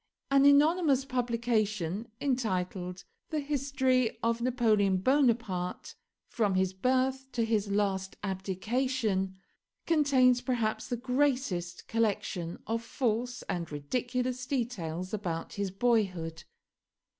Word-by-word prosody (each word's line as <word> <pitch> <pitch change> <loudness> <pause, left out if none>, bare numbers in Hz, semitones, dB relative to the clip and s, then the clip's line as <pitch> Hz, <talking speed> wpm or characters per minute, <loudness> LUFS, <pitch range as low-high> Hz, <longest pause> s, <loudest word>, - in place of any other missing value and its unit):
An 275 0 +5
anonymous 285 -1 +5
publication, 230 - -1
entitled 185 -8 -2 0.3
the 310 - -1
'History 265 -4 +1
of 230 0 +1
Napoleon 220 -6 +2
Bonaparte', 225 -6 +1 0.3
from 205 -5 0
his 190 0 +1
Birth 260 +5 0
to 235 -2 +1
his 215 -3 0
last 195 -2 0
abdication, 195 +1 -1 0.5
contains 265 -6 +4
perhaps 230 -4 -1
the 245 - -2
greatest 250 -9 -1
collection 200 -6 -1
of 225 +1 -1
false 240 0 -2
and 170 -3 -4
ridiculous 250 - -2
details 185 - -3
about 175 -6 -3
his 200 -1 -2
boyhood. 185 -7 0
230 Hz, 100 wpm, -30 LUFS, 190-255 Hz, 0.5 s, An